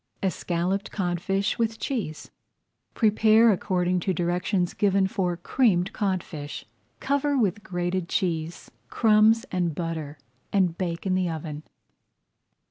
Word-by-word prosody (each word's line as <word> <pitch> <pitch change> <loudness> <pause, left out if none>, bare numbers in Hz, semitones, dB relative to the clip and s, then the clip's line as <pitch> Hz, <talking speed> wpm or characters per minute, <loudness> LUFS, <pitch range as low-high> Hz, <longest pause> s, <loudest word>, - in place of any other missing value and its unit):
ESCALLOPED 185 +1 -1
CODFISH 195 +2 -1
WITH 225 -1 0
CHEESE 215 - -4 0.6
Prepare 220 +1 +5
according 180 -2 0
to 185 +1 -1
directions 175 +2 0
given 195 -1 +2
for 180 -2 -1
Creamed 185 -2 +1
Codfish. 170 -7 -3 0.3
Cover 285 +1 0
with 210 -4 +1
grated 175 -1 -3
cheese, 165 -2 -2 0.2
crumbs, 220 +1 +4
and 175 -4 -1
butter, 160 -3 -4 0.3
and 185 -4 +2
bake 170 -1 -3
in 190 - +1
the 185 -1 +1
oven. 155 -2 -5
185 Hz, 115 wpm, -26 LUFS, 175-210 Hz, 0.6 s, Prepare